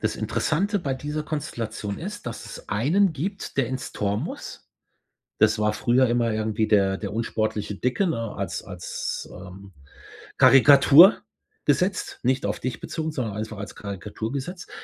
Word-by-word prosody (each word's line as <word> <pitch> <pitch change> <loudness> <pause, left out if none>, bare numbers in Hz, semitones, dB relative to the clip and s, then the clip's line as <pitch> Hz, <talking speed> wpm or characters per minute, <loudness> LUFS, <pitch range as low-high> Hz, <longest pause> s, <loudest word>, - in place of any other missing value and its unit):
das - - -1
Interessante 200 +6 0
bei 140 -6 -2
dieser 150 +3 -4
Konstellation 115 -9 -4
ist, 195 -4 -7
dass 115 - -6
es - - -10
einen 160 - +2
gibt, 190 +6 -5
der 130 -4 +1
ins 130 0 -5
Tor 100 -1 -1
muss. - - -7 0.7
Das 110 +1 +4
war 105 0 +2
früher 125 +4 +3
immer 120 -1 +1
irgendwie 110 0 -1
der 95 -2 +3
der 105 -1 -5
unsportliche 110 -2 -2
Dicke, 125 - 0
ne? 115 -9 -2
Als - - -3
als, - - -5
ähm, 95 +1 -11 0.7
Karikatur 145 - +8 0.4
gesetzt, 185 +1 0
nicht 130 +5 +1
auf - - -2
dich 130 -1 -4
bezogen, 160 0 -4
sondern 115 -8 -3
einfach 110 0 -5
als 100 0 -7
Karikatur 105 +3 -6
gesetzt. 175 +6 -6
120 Hz, 155 wpm, -24 LUFS, 105-150 Hz, 0.7 s, Karikatur